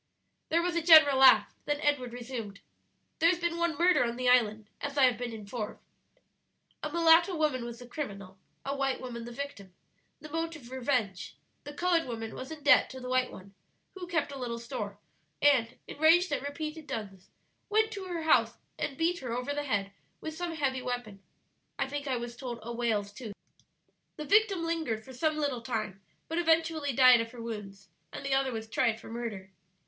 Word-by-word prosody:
There 335 +1 +2
was 355 -1 -1
a 340 - +1
general 315 -4 +8
laugh; 265 -1 +7
then 295 0 -1
Edward 285 -5 0
resumed: 235 -4 -7 0.6
"There 330 - +5
has 360 - +2
been 340 0 -2
one 340 -3 0
murder 345 -6 +4
on 235 -1 -2
the 250 0 -2
island, 220 -4 +3
as 285 0 -4
I 275 - +5
have 250 -3 +4
been 245 -1 -3
informed. 215 0 -6 1.0
A 300 - -4
mulatto 335 +2 +5
woman 300 -6 0
was 235 0 -7
the 245 - -11
criminal, 200 - -7 0.3
a 275 +1 -2
white 270 -1 0
woman 235 -2 -6
the 240 - -8
victim, 235 -8 -7 0.4
the 305 0 -11
motive 325 -6 -4
revenge; 240 -8 -2 0.3
the 290 - -7
colored 345 -2 +1
woman 225 -2 -5
was 260 - -7
in 315 -2 -9
debt 290 - +6
to 260 - -8
the 250 0 -7
white 255 0 +1
one, 195 +1 -12 0.4
who 370 -2 -8
kept 330 -4 -1
a 275 - -7
little 235 -2 -3
store, 230 -4 -5 0.4
and, 255 -5 +3
enraged 325 +3 +4
at 285 - 0
repeated 305 +2 -5
duns, 195 -4 -6 0.4
went 440 +1 +2
to 395 -3 -6
her 345 -3 -4
house 315 - +3 0.2
and 275 - -3
beat 340 +1 +1
her 250 -3 -5
over 250 +4 -2
the 290 0 -3
head 200 -6 -1 0.3
with 315 -1 -6
some 345 0 -4
heavy 265 -4 -1
weapon 245 -6 -5 0.6
I - - 0
think 285 +1 -5
I 260 -2 0
was 240 0 -6
told 245 -1 -6
a 235 +2 -5
whale's 220 -4 -1
tooth. 220 -3 -8 0.8
"The 305 - -6
victim 405 -1 +3
lingered 320 -10 -2
for 260 - -11
some 310 +4 0
little 285 -5 -1
time, 215 -5 -4 0.3
but 325 +1 -1
eventually 325 -3 +2
died 255 -2 +7
of 230 0 -5
her 240 - -9
wounds, 200 -4 -7 0.2
and - - -7
the 275 - 0
other 270 -1 +2
was 225 -1 -5
tried 225 0 +1
for - - -13
murder. 220 -5 -6
260 Hz, 195 wpm, -30 LUFS, 230-315 Hz, 1.0 s, general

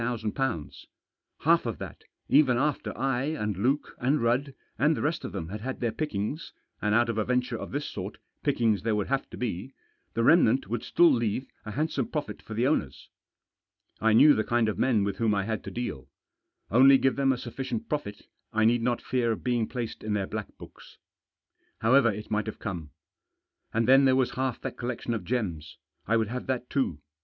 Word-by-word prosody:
Half - - +3
of - - -3
that, - - -9 0.2
even 135 -4 +5
after 150 +3 -1
I, 135 -2 0
and 105 -10 -2
Luke, 130 +10 0
and 135 +4 +2
Rudd, 130 +4 0 0.2
and 150 +2 +3
the - - -2
rest 155 +3 -1
of - - -5
them 85 -5 -5
had 105 +2 -6
had 130 +3 -4
their 120 -2 0
pickings 145 +1 -3
— - - -44
and 105 0 +2
out 120 +1 +4
of 115 -1 -1
a - - +2
venture 125 +2 0
of - - -6
this 145 +2 -3
sort 95 +1 -6 0.2
pickings 115 - +1
there 110 +1 0
would 105 +1 -2
have 135 0 -1
to - - -9
be 125 +2 -4 0.2
— - - -45
the 115 - +1
remnant 135 - +4
would 120 +4 -2
still 175 -1 +4
leave 115 +2 0 0.2
a - - -4
handsome 150 -4 -1
profit 125 -10 -4
for 110 - -8
the 120 +3 +1
owners. 130 - -1 0.9
I 110 0 +3
knew 145 +7 +8
the 110 - +1
kind 120 -1 +1
of 105 - -2
men 115 -6 +3
with 100 -1 -2
whom 110 -3 +2
I 100 - 0
had 110 0 -3
to - - -4
deal. 70 - -5 0.6
Only 135 +4 +7
give 135 0 +2
them 135 -1 +3
a 130 - 0
sufficient 120 -1 -5
profit, 145 -9 -4 0.3
I 110 -1 +2
need 120 +1 +3
not 120 0 0
fear 120 -3 +1
being 120 -2 -1
placed 120 -3 -5
in 105 -1 -2
their 100 -2 0
black 110 +1 -6
books. - - -14 0.8
However 120 +1 +5
it 105 +1 -8
might 105 0 0
have 110 - -5
come. 85 -7 -5 0.8
And 115 0 +1
then 135 +1 +7
there 130 -1 +5
was 130 -1 +2
half 130 -2 -2
that - - -5
collection 120 -1 -3
of 110 -5 -3
gems 95 -11 -3
— - - -40
I 115 +3 +3
would 110 -2 0
have 125 +2 -5
that 125 -1 -2
too. 85 - -1
120 Hz, 205 wpm, -28 LUFS, 105-135 Hz, 0.9 s, knew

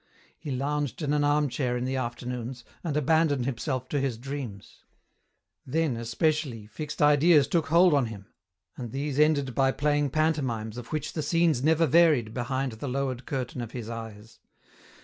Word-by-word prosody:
He - - -7
lounged 145 +3 -2
in 145 0 0
an 150 -1 +2
armchair 145 -4 +1
in 125 - -2
the 130 +1 -2
afternoons, 120 0 -4 0.2
and 155 -4 -1
abandoned 150 -3 +2
himself 130 0 -2
to 145 - 0
his 135 -4 -1
dreams: 125 -5 -7 0.8
then, 155 -1 0
especially, 115 0 -1
fixed 145 +8 -4
ideas 150 0 +5
took 165 -3 0
hold 170 +3 +5
on 140 -4 +3
him, 100 -3 -9 0.5
and 120 -3 -6
these 140 +1 -2
ended 145 -4 +3
by 135 0 +3
playing 145 0 +1
panto 155 +2 +1
mimes 115 -3 -4
of 120 - -10
which 155 -2 -3
the 155 - -2
scenes 160 -3 +2
never 160 +2 +4
varied 150 -8 +4
behind 130 +2 -2
the 110 +6 -6
lowered 130 -1 -2
curtain 130 -2 -3
of 120 -1 -7
his 115 -2 -6
eyes. 115 -1 -9
135 Hz, 170 wpm, -27 LUFS, 120-150 Hz, 0.8 s, ideas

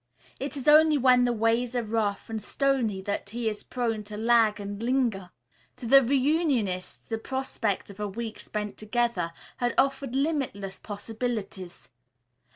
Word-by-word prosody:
It 275 +1 -4
is 270 - -6
only 305 0 +7
when 250 -2 +5
the 245 - +2
ways 230 +2 +1
are 240 - +1
rough 215 -2 -1
and 220 -1 -4
stony 235 -5 0
that 200 0 -3
he 235 +1 -3
is 210 -1 -2
prone 230 -4 -2
to 210 0 -8
lag 225 -1 +3
and 205 +1 -6
linger. 235 -7 0 0.5
To - - -9
the 270 +4 +7
reunionists 260 - 0
the 225 -1 -3
prospect 230 -6 -2
of 200 - -15
a 210 - -1
week 225 +2 -6
spent 210 -1 -5
together 215 -5 -1 0.3
had 245 -1 -1
offered 270 -2 +1
limitless 270 -10 -1
possibilities. 205 - -5
230 Hz, 155 wpm, -27 LUFS, 210-260 Hz, 0.5 s, only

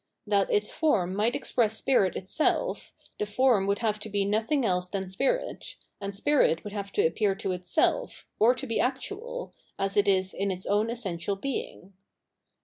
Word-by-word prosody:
That 200 -2 +2
its 210 0 +1
form 205 - +1
might 220 +4 +1
express 225 -3 +1
spirit 205 -7 +2
itself, 195 - -1 0.2
the 210 - -1
form 215 -3 +3
would 200 0 +2
have 215 -1 +1
to 215 - -6
be 200 -1 0
nothing 225 +7 +1
else 180 -2 0
than 190 -1 -3
spirit, 275 - -2 0.3
and 200 0 -4
spirit 235 - +2
would 210 - -7
have 200 -1 -5
to - - +2
appear 195 +4 +1
to 195 0 -3
itself, 185 - 0
or 235 +4 +5
to 270 - -5
be 230 -3 -1
actual, 415 - -3 0.2
as 195 0 -1
it 205 0 +3
is 190 -1 +2
in 200 +1 -1
its 185 -1 -4
own 210 +2 +1
essential 200 -5 -3
being. 195 -5 -5
205 Hz, 175 wpm, -28 LUFS, 195-250 Hz, 0.3 s, or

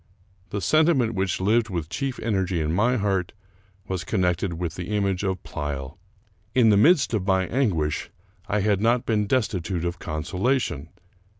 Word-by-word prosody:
The 100 - -3
sentiment 140 - +3
which 95 -3 -1
lived 110 +4 +2
with 85 -5 -3
chief 130 - -3
energy 95 -5 0
in 80 0 -1
my 120 +7 +2
heart 95 -4 -1 0.5
was 95 -3 -3
connected 90 0 0
with 85 -1 -3
the 90 +5 -4
image 100 -2 0
of 95 -3 -2
Pleyel. 75 -1 -5 0.6
In 120 -3 +5
the 105 - +5
midst 140 - +4
of 100 -3 -1
my 95 -1 +3
anguish, 90 - 0 0.4
I 105 0 0
had 100 -1 +1
not 120 +2 +2
been 105 -2 +1
destitute 95 -8 -1
of 85 0 -3
con 75 -1 -4
solation. 95 - -1
95 Hz, 165 wpm, -24 LUFS, 85-110 Hz, 0.6 s, In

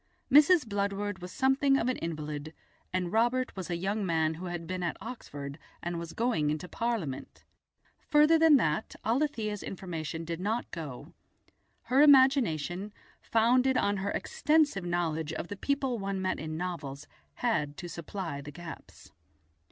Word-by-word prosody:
Mrs. 300 +1 +6
Bludward 200 -1 -2
was 180 0 -8
something 270 +3 +3
of 240 - 0
an 255 - 0
invalid, 155 -1 -5 0.4
and 180 -2 -1
Robert 240 +3 +2
was 190 -3 -5
a 170 - -1
young 200 +4 -1
man 160 -3 +1
who 175 +3 -7
had 175 -1 -4
been 185 +1 -4
at 175 - -2
Oxford 145 - -7 0.2
and 175 0 -2
was 170 -1 -7
going 225 -11 +1
into 155 +4 -2
Parliament. 220 - -3 0.6
Further 300 +2 +5
than 320 -3 +7
that 160 - -1
Alethia's 225 -5 0
information 165 -3 -5
did 165 0 -4
not 220 +6 -2
go; 150 -7 -7 0.7
her 255 +4 +3
imagination, 235 - +4 0.3
founded 250 +3 +3
on 205 -3 +1
her 195 +1 -2
extensive 310 - +1
knowledge 165 -3 -1
of 170 - -5
the 200 - -4
people 270 +1 -1
one 195 -1 -2
met 185 0 -1
in 155 0 -4
novels, 150 -6 -5 0.3
had 150 -12 0
to 185 -2 -6
supply 170 -2 -5
the 145 - -9
gaps. 165 +3 -11
190 Hz, 150 wpm, -30 LUFS, 165-245 Hz, 0.7 s, than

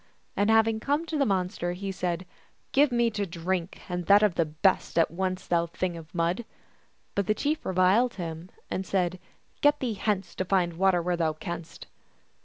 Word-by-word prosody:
And 205 +1 +2
having 225 0 +4
come 290 +7 0
to 325 - -4
the 275 - +3
mon 185 -3 +1
ster, 175 -3 -3
he 195 +2 -4
said, 180 -1 -2 0.2
" - - -40
Give 285 0 +4
me 235 -1 +2
to 205 -2 -2
drink, 175 +1 -3
and 180 -1 -4
that 205 +1 +7
of 210 -4 +4
the 165 - +1
best, 160 +5 +1
at 165 - +4
once, 185 +2 -2
thou 170 -1 +1
Thing 175 +1 -3
of 165 +1 -11
Mud! 175 +6 0 0.3
" - - -39
But 200 -2 -1
the 215 - +2
chief 300 +5 -1
reviled 190 +7 +3
him, 170 -1 -6 0.2
and 190 - -2
said, 185 -1 -1 0.2
" - - -38
Get 290 0 +4
thee 245 -4 -1
hence, 200 -3 -1
to 185 - -3
find 180 -2 +1
water 180 0 +2
where 175 0 0
thou 160 -2 +1
canst." 170 +1 -7
185 Hz, 205 wpm, -27 LUFS, 175-210 Hz, 0.3 s, that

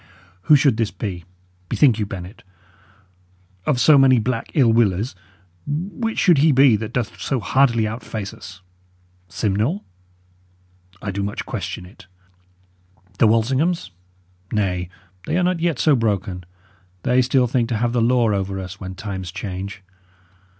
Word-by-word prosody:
Who 150 - +9
should 135 -5 +3
this 115 -2 0
be? 90 -5 -6 0.4
Bethink 125 -7 +3
you, 105 - -1
Bennet. 95 +1 -8 1.3
Of 135 -5 +2
so 145 +3 +6
many 130 -1 +6
black 115 0 -2
ill 120 -6 +4
willers, 110 0 +1 0.5
which 195 +10 -3
should 175 -7 +4
he 155 +2 +5
be 135 -3 +5
that 105 +1 -4
doth 120 -4 -3
so 135 - -1
hardily 115 +1 +2
outface 110 -2 -5
us? 95 -1 -12 0.7
Simnel? 110 - -1 1.2
I 100 - -2
do 100 +1 -3
much 100 +1 -4
question - - -5
it. 90 -1 -16 1.1
The 115 - +6
Walsinghams? 130 - +1 0.6
Nay, 90 -4 -1 0.4
they - - 0
are 180 - +2
not 180 -1 +1
yet 165 -4 0
so 150 +1 +4
broken; 100 -6 -2 0.6
they 125 +1 +3
still 125 0 +2
think 120 -1 0
to 115 - 0
have 120 +1 0
the 120 - +1
law 120 -1 +3
over 95 -1 -2
us, 95 +1 -8
when 95 -1 -7
times 95 -2 -6
change. 95 0 -6
115 Hz, 145 wpm, -21 LUFS, 100-130 Hz, 1.3 s, Who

